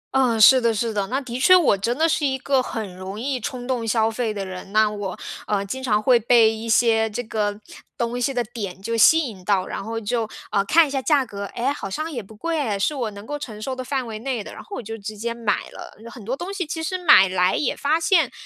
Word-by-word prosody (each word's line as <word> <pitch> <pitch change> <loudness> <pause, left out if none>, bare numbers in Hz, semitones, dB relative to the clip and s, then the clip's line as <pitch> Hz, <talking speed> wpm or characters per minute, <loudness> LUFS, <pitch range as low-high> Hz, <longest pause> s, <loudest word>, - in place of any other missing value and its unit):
嗯， 250 -4 +3
是 255 +4 +8
的 230 -1 +1
是 225 +1 -1
的， 200 -2 -1
那 260 +5 -1
的 250 -3 -6
确 370 +7 +7
我 340 - +4
真 230 +6 -2
的 320 +2 +3
是 320 -1 0
一 265 -2 +1
个 265 0 +1
很 215 -6 -5
容 190 +3 -7
易 260 +2 -2
冲 245 +1 -5
动 245 -3 -2
消 220 0 +2
费 230 -1 -2
的 200 -2 -4
人。 185 +1 -8
那 215 +1 +4
我， 205 -3 -5 0.3
呃， 200 -1 0
经 260 +7 -5
常 215 -5 +1
会 245 +1 +5
被 230 -1 +4
一 225 +1 -6
些 225 -1 +3
这 220 +3 -4
个 210 -2 -2 0.4
东 240 +1 -2
西 260 - +1
的 245 -2 -1
点 210 -5 -7
就 230 +4 -3
吸 320 +9 +6
引 220 - -6
到， 190 -1 +1
然 - - -5
后 225 +2 -4
就， 225 +1 -2 0.2
呃， 200 - +2
看 320 +8 +5
一 - - -8
下 270 -1 -1
价 280 -1 +2
格， 200 -3 -6
哎， 255 +4 0
好 195 - -6
像 310 +11 -4
也 245 - -4
不 215 +2 -15
贵 325 +8 -2
哎， 220 -8 -1
是 200 +9 0
我 250 -6 -2
能 200 0 -11
够 295 +4 -5
承 225 -7 -8
受 260 +4 -4
的 255 - -5
范 265 0 -2
围 220 -2 -6
内 245 -2 -3
的， - - -10
然 - - -9
后 410 - -9
我 - - -6
就 225 +1 -6
直 215 +1 -7
接 230 +3 -3
买 230 -3 -1
了。 - - -11
有 - - -10
很 235 - -11
多 250 +6 -3
东 370 +3 -5
西 390 -2 -2
其 320 +1 -4
实 345 +4 -2
买 300 - +7
来 185 0 +1
也 285 - 0
发 310 +3 +1
现， 320 -5 +3
230 Hz, 290 characters per minute, -22 LUFS, 210-265 Hz, 0.4 s, 是